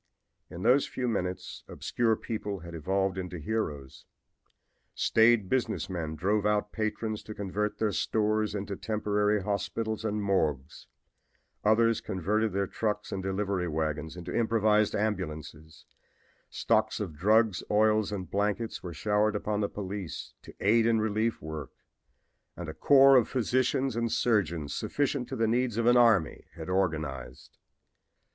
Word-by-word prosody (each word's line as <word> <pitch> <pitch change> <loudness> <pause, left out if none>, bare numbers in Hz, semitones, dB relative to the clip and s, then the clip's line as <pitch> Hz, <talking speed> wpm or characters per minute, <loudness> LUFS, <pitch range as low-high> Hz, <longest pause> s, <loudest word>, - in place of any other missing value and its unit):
In 85 +2 -8
those 135 +3 +4
few 125 - -3
minutes 90 -5 -3
obscure 115 -2 0
people 105 -4 -5
had 85 0 -9
evolved 95 +4 -1
into 90 -1 -5
heroes; 75 -7 -4 0.9
staid 110 -3 +4
business 125 -4 -1
men 80 -3 -3
drove 100 +6 0
out 105 0 +1
patrons 110 0 -3
to 110 - -9
convert 105 +1 -2
their 110 -2 0
stores 110 0 0
into 100 0 -4
temporary 105 -1 0
hospitals 105 +2 -2
and 105 -1 -1
morgues; 75 -9 -1 0.8
others 115 +1 +3
converted 105 +3 -1
their 100 +1 0
trucks 105 +1 -3
and 95 - -3
delivery 95 -1 -1
wagons 80 +1 -3
into 90 0 -6
improvised 110 -2 +2
ambulances; 80 -6 -4 0.6
stocks 110 -1 +1
of 95 -8 -4
drugs, 105 +4 +3
oils 110 0 +3
and 95 -3 -5
blankets 105 +3 -1
were 85 -3 -7
showered 105 +4 +1
upon 105 0 -1
the 100 - 0
police 100 -3 -6
to - - -13
aid 115 +3 +3
in 115 -1 +3
relief 110 0 -1
work 80 -3 -6 0.8
and 90 - -6
a 80 - -5
corps 135 - +6
of 120 - +2
physicians 130 0 0
and 115 -1 -1
surgeons 85 -10 0
sufficient 140 -3 -1
to 135 - -4
the 115 -2 +1
needs 120 0 0
of 115 - +1
an 120 +1 +5
army 115 -10 +3
had 80 +1 -7
organized. 75 -9 -3
105 Hz, 140 wpm, -29 LUFS, 90-110 Hz, 0.9 s, corps